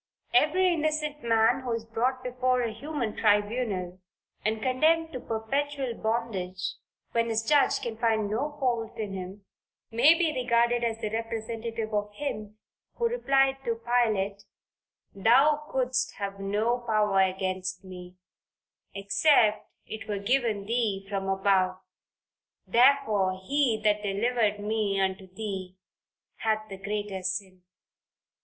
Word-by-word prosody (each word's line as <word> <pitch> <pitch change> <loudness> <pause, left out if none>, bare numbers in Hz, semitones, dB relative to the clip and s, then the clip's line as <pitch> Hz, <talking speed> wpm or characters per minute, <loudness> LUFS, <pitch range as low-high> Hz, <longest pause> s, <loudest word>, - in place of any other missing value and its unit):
Every 365 +2 +4
innocent 305 -2 -1
man 230 +2 +3
who 250 -3 -3
is 230 -1 -3
brought 250 +3 -1
before 250 0 0
a 230 -2 -2
human 245 -2 -4
tribunal, 205 -4 0 0.4
and 220 +1 0
condemned 315 +7 +2
to 255 - -4
perpetual 265 +4 -2
bondage, 210 -6 -2 0.4
when 230 0 +1
his 225 0 0
judge 295 -2 +4
can 230 -2 -5
find 220 -2 +1
no 290 +8 -2
fault 240 -4 -1
in 210 -3 -4
him, 190 +1 -7 0.5
may 290 +9 +6
be 325 -3 +1
regarded 240 -2 +2
as 230 -1 0
the 215 -2 -4
representative 225 0 -4
of 210 0 -1
Him, 215 -7 -5 0.4
who 470 -1 +1
replied 270 - +2
to 230 - -1
Pilate, 220 -4 0 0.7
"Thou 270 +9 +4
couldst 255 0 0
have 200 -1 -5
no 210 +5 0
power 210 -4 +2
against 185 0 -1
me, 180 -1 -10 0.8
except 210 +3 +3 0.2
it 220 - -7
were 205 -1 -2
given 220 -1 0
thee 215 -4 -1
from 195 -1 -3
above: 190 -1 +2 0.9
therefore 220 -7 +3
he 270 -2 +1
that 210 -1 +2
delivered 210 +1 0
me 210 -1 -1
unto 190 -1 -2
thee 190 -2 -5 0.6
hath 215 -1 -1
the 195 - -7
greater 200 0 -4
sin." 185 0 -3
220 Hz, 130 wpm, -28 LUFS, 200-250 Hz, 0.9 s, may